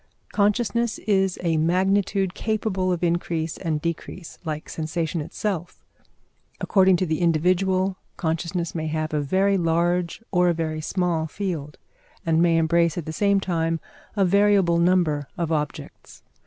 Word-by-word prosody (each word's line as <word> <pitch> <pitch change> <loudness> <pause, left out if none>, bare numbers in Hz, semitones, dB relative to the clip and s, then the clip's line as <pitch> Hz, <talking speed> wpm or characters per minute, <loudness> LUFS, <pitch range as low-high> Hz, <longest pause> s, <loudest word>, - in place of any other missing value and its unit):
Consciousness 220 +2 +1
is 195 -3 +1
a 165 -2 +1
magnitude 190 +3 +1
capable 205 -4 -1
of 180 -1 -2
increase 170 -2 -1
and 160 -4 -2
decrease, 170 +2 -5
like 155 -2 -4
sensation 160 +1 -3
itself. 175 +2 -4 0.7
According 190 -2 +4
to 185 - 0
the 160 -2 -1
individual, 185 +3 +2 0.2
consciousness 170 +1 -2
may 160 -2 -3
have 155 0 -2
a 150 - +1
very 190 +7 +2
large 170 +3 0
or 180 -1 +3
a 170 - +1
very 155 -1 -2
small 170 -1 -1
field, 160 -5 -4 0.5
and 165 0 +3
may 170 -1 +4
embrace 170 0 +2
at 170 - -3
the 160 - -5
same 200 +3 +2
time 165 -3 -1 0.4
a 200 -2 +3
variable 195 -2 +4
number 170 -5 +2
of 170 -2 -2
objects. 150 -2 -5
175 Hz, 140 wpm, -24 LUFS, 160-190 Hz, 0.7 s, According